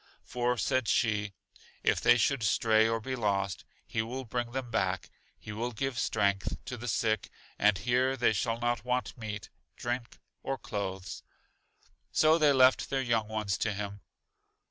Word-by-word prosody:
For, 125 0 -1
said 130 +3 +1
she, 105 -3 +1 0.5
if - - +2
they 120 - +6
should 135 +2 +2
stray 110 +1 +3
or 115 0 0
be 130 +4 -4
lost, 100 -5 -1 0.2
He 110 - -1
will 125 +4 -5
bring 120 +1 -3
them 130 -2 -4
back; 95 -5 -1 0.3
He 105 - -9
will 115 +3 -3
give 125 +1 -2
strength, 100 -3 0
to 125 - -5
the 120 0 -7
sick, 110 0 0 0.3
and 105 -1 +4
here 125 +5 +1
they 120 -3 +3
shall 115 +2 -1
not 120 0 0
want 125 0 -1
meat, 110 -3 -6 0.2
drink, 120 0 -4 0.2
or 135 - -2
clothes. 95 -4 -5 0.9
So 155 +1 +4
they 150 -2 +5
left 130 -1 +5
their 135 -1 0
young 115 -3 +1
ones 110 -1 -2
to 110 - 0
Him. 100 0 -5
115 Hz, 165 wpm, -30 LUFS, 105-125 Hz, 0.9 s, they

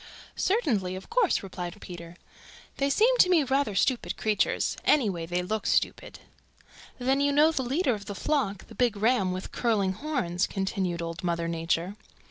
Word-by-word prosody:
"Certainly. 230 - 0
Of 190 - -10
course," 460 - +2
replied 180 0 -6
Peter. 170 -3 -9 0.6
"They 275 0 +1
seem 460 - +4
to 365 - +6
me 340 -5 +4
rather 270 -5 0
stupid 250 +5 0
creatures. 215 -1 0
Anyway 195 - +2
they 180 +1 -1
look 215 +3 -2
stupid." - - 0 0.8
"Then 265 +2 +1
you 285 0 +3
know 300 +3 +5
the 290 - -1
leader 265 +2 +1
of 205 -2 -6
the 205 - -5
flock, 215 -6 -1
the - - -14
big 240 -4 +1
ram 215 -3 +2
with 185 +1 -5
curling 205 -6 +1
horns," 215 - -1
continued 190 -3 -2
Old 165 +2 -6
Mother 170 -1 -1
Nature. 170 +3 -2
210 Hz, 165 wpm, -27 LUFS, 180-275 Hz, 0.8 s, to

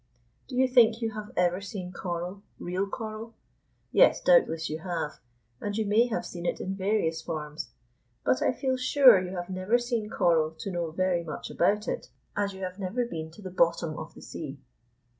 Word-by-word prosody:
Do 255 - -7
you 260 +1 +4
think 230 -3 +5
you 225 -2 -1
have 215 -1 -7
ever 180 +1 +2
seen 185 -2 -6
coral, 180 +2 -4 0.2
real 185 +3 -2
coral? 220 +2 -6 0.6
Yes, - - +6
doubtless 290 - +4
you 155 +1 -4
have, 165 -4 -3 0.4
and 205 0 -3
you 220 - +1
may 215 +4 +4
have 230 - -2
seen 175 0 -5
it - - -1
in 190 - -3
various 190 -5 0
forms. 150 -3 -5 0.5
But 130 0 +2
I - - +3
feel 260 0 -1
sure 255 -5 +7
you 185 +1 -5
have 175 +1 -5
never 185 +5 +2
seen 240 -3 -2
coral 160 -5 +2
to 195 - -5
know 175 -2 -2
very 175 +1 0
much 155 -3 -6
about 205 +4 +2
it, - - -3 0.3
as 200 -1 0
you 190 0 -8
have 185 +1 -5
never 205 +6 -1
been 160 -8 -5
to 185 +6 -14
the 185 - -6
bottom 170 -2 +2
of 155 +1 -8
the - - -12
sea. 145 -3 -7
185 Hz, 195 wpm, -28 LUFS, 170-220 Hz, 0.6 s, sure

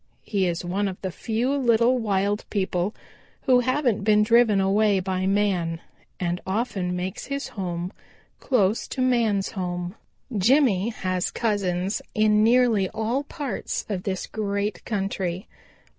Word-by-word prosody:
He 195 -3 0
is 175 0 -2
one 195 +3 0
of 190 -1 -5
the 190 - -2
few 235 +9 -1
little 240 -2 +3
wild 205 -1 0
people 190 -1 -1 0.5
who 255 -1 +5
haven't 250 -4 +1
been 210 0 +4
driven 230 -2 +4
away 200 +1 +3
by 185 0 -1
man, 190 -5 +1 0.4
and 175 -1 -1
often 190 -3 -2
makes 180 +1 -4
his 280 +1 -4
home 180 -3 -4 0.5
close 215 -5 +1
to 260 - -4
man's 225 -6 +2
home. 180 -2 -3 0.4
"Jimmy 225 -1 +3
has 185 -5 -2
own - - -7
cousins 195 -3 0
in 215 0 +4
nearly 230 -5 +4
all 225 +6 -2
parts 285 -8 -4
of 195 -4 -2
this 190 -1 -3
great 200 -2 -2
country. 195 -2 -2
205 Hz, 140 wpm, -25 LUFS, 185-230 Hz, 0.5 s, who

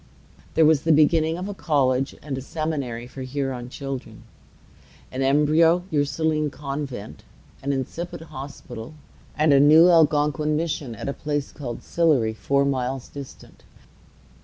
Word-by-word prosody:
There 160 - +5
was 155 -2 +4
the 160 - +2
beginning 160 +2 +3
of 185 +2 -4
a 205 - -4
college 135 -7 +1
and 140 -2 -4
a 130 - -5
seminary 140 -6 -3
for 130 +2 -10
Huron 130 -2 -4
children, 135 -1 -7 0.9
an 130 - -4
embryo 155 +5 +4
Ursuline 150 +1 +1
convent, 140 - -6 0.4
an 140 - -1
incipient 160 +5 -5
hospital, 135 -1 -8 0.4
and 155 -1 +4
a 140 - +6
new 155 +5 +7
Algonquin 150 -2 +3
mission 150 -7 -3
at - - -7
a 140 - -1
place 145 -1 -3
called 120 -5 -7
Sillery, 145 -10 +2
four 140 +5 +1
miles 130 -1 -2
distant. 140 -2 -11
145 Hz, 135 wpm, -24 LUFS, 135-155 Hz, 0.9 s, new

